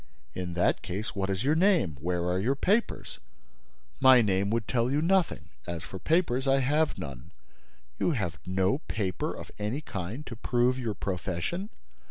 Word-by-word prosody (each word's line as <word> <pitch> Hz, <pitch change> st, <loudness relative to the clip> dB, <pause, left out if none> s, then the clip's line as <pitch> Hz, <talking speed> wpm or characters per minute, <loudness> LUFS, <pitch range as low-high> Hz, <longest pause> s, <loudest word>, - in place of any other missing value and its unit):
"In 90 Hz, +1 st, -4 dB
that 90 Hz, -, +2 dB
case, 105 Hz, +5 st, -4 dB
what 95 Hz, -1 st, -1 dB
is 95 Hz, +2 st, -1 dB
your 145 Hz, +3 st, +3 dB
name? 165 Hz, -, +3 dB
Where 85 Hz, +2 st, -1 dB
are 90 Hz, +1 st, +1 dB
your 125 Hz, +8 st, +1 dB
papers?" 210 Hz, +10 st, 0 dB, 0.8 s
"My 130 Hz, -1 st, +8 dB
name 100 Hz, -1 st, +1 dB
would 115 Hz, -1 st, -1 dB
tell 120 Hz, -1 st, +1 dB
you 140 Hz, +2 st, +1 dB
nothing. 180 Hz, +2 st, +1 dB, 0.2 s
As 85 Hz, -1 st, -4 dB
for 95 Hz, -, -8 dB
papers, 140 Hz, -, +1 dB
I 135 Hz, 0 st, +5 dB
have 150 Hz, +4 st, +1 dB
none." 65 Hz, -3 st, -7 dB, 0.7 s
"You -, -, +2 dB
have 90 Hz, -, -2 dB
no 95 Hz, +7 st, +1 dB
paper 100 Hz, -, -2 dB
of -, -, -8 dB
any 105 Hz, +8 st, -2 dB
kind 110 Hz, -, -5 dB
to 115 Hz, -, -7 dB
prove 125 Hz, +2 st, +1 dB
your 115 Hz, -5 st, -2 dB
profession!" 95 Hz, -, -3 dB
110 Hz, 170 wpm, -29 LUFS, 95-140 Hz, 0.8 s, My